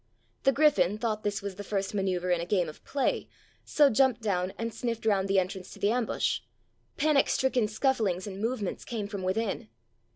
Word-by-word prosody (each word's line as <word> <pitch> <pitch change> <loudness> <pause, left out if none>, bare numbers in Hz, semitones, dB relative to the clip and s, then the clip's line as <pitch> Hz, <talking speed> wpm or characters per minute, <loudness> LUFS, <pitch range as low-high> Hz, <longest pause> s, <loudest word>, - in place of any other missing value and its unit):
The 270 - +6
griffon 215 - +3
thought 215 -2 -1
this 205 -1 -2
was 200 -2 -5
the 205 - -5
first 195 -1 -2
manoeuvre 185 -3 0
in 170 - 0
a - - -3
game 180 -3 +2
of 155 - -10
play, 280 -2 -1 0.3
so 290 -2 +4
jumped 255 0 +3
down 185 -3 0
and 230 0 -3
sniffed 230 0 -3
round 200 -3 +2
the 195 0 +2
entrance 185 0 -1
to - - -13
the 205 - +2
ambush. 240 -1 0 0.6
Panic 295 -1 +3
stricken 255 -4 +2
scufflings 215 -5 0
and 200 -1 -6
movements 220 -4 -2
came 225 -4 -4
from 200 -2 -5
within. 190 - -2
210 Hz, 190 wpm, -29 LUFS, 190-235 Hz, 0.6 s, The